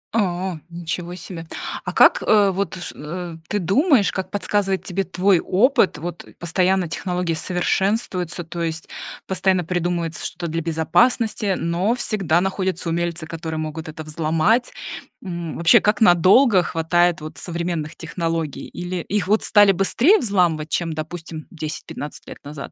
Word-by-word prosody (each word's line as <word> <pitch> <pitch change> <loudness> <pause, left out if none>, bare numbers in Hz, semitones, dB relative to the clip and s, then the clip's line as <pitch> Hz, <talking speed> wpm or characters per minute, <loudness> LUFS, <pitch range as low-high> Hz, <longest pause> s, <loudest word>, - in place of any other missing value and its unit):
О, 185 -5 -1
ничего 175 +1 -5
себе! 165 -2 -8 0.4
А - - -2
как, - - +5
э, 205 -2 +4
вот, 190 -1 -2
ш 175 -1 -7
э, 170 +2 -6
ты 210 - 0
думаешь, 205 - +3
как 190 - -4
подсказывает 200 -2 0
тебе 190 +1 -2
твой 185 0 +2
опыт, 230 - +2
вот 170 +2 -6
постоянно 180 +1 +1
технологии 180 0 -2
совершенствуются, 180 +1 -1
то 170 +1 -6
есть 160 -1 -3 0.4
постоянно 190 -1 +1
придумывается 170 -1 -2
что-то 175 - -5
для 165 +1 -2
безопасности, 190 +6 +1
но 175 +7 0
всегда 190 -8 +1
находятся 190 -3 -2
умельцы, 170 0 -1
которые 160 0 -5
могут 155 0 -5
это 155 0 -7
взломать, 160 +10 +1 0.5
м, 170 -3 -5
вообще, 170 0 +6
как 210 +2 +1
надолго 190 +3 +6
хватает 175 +1 +1
вот 155 0 -8
современных 170 -3 -3
технологий? 165 -4 -3
Или 180 +1 -5
их 185 +1 -2
вот 215 +2 +2
стали 205 -2 +6
быстрее 235 - +3
взламывать, 175 - +1
чем, 165 0 -1
допустим, 160 0 -6
10-15 155 -2 -6
лет - - -9
назад? 145 0 -8
175 Hz, 145 wpm, -21 LUFS, 165-195 Hz, 0.5 s, вообще